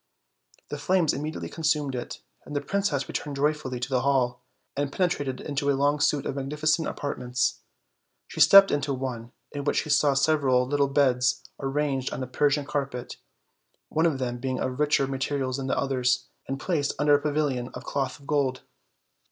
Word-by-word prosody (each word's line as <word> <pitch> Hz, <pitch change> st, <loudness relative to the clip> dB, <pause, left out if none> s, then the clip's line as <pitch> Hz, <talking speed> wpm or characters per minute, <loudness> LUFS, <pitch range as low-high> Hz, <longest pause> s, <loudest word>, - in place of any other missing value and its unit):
The -, -, -5 dB
flames 185 Hz, -4 st, +2 dB
immedi 150 Hz, +3 st, -4 dB
ately -, -, -6 dB
consumed 150 Hz, -4 st, 0 dB
it; 120 Hz, -1 st, -6 dB, 0.2 s
and 150 Hz, -, -8 dB
the -, -, +2 dB
princess 155 Hz, -4 st, -1 dB
returned 145 Hz, -1 st, -4 dB
joyfully 145 Hz, -3 st, -1 dB
to 125 Hz, -, -3 dB
the 130 Hz, -2 st, +1 dB
hall, 125 Hz, -2 st, +1 dB, 0.3 s
and 140 Hz, 0 st, -1 dB
penetrated 145 Hz, -7 st, -1 dB
into 145 Hz, -1 st, -2 dB
a 140 Hz, -, +2 dB
long 145 Hz, +2 st, +2 dB
suit 145 Hz, -1 st, +1 dB
of 140 Hz, -, -3 dB
magnificent 150 Hz, +3 st, 0 dB
apartments. 125 Hz, -3 st, -2 dB, 0.7 s
She -, -, -8 dB
stopped 195 Hz, 0 st, +8 dB
in 145 Hz, -, +1 dB, 0.2 s
one, 120 Hz, -3 st, -5 dB, 0.2 s
in 145 Hz, -1 st, -5 dB
which 145 Hz, -, +1 dB
she 155 Hz, -, -4 dB
saw 145 Hz, -1 st, +4 dB
sev 155 Hz, +3 st, +3 dB
eral 125 Hz, -2 st, +2 dB
little 145 Hz, +1 st, +2 dB
beds 130 Hz, -2 st, +2 dB, 0.2 s
arranged 135 Hz, -1 st, -1 dB
on 130 Hz, -, -4 dB
a -, -, -5 dB
Persian 145 Hz, +2 st, +1 dB
carpet, 135 Hz, -4 st, -4 dB, 0.7 s
one 160 Hz, +2 st, +2 dB
of 150 Hz, -5 st, 0 dB
them 120 Hz, -2 st, -3 dB
being 130 Hz, 0 st, -2 dB
of 130 Hz, +1 st, -3 dB
richer 150 Hz, -2 st, +3 dB
materials 135 Hz, -1 st, -2 dB
than 135 Hz, -1 st, -4 dB
the -, -, 0 dB
others, 125 Hz, -2 st, +1 dB, 0.2 s
and 135 Hz, 0 st, -3 dB
placed 150 Hz, -3 st, -1 dB
under 145 Hz, 0 st, +3 dB
a 145 Hz, -, +4 dB
pavilion 145 Hz, -5 st, -1 dB
of -, -, -7 dB
cloth 140 Hz, +1 st, -3 dB
of 140 Hz, -, -17 dB
gold. 140 Hz, -3 st, 0 dB
140 Hz, 185 wpm, -26 LUFS, 130-150 Hz, 0.7 s, stopped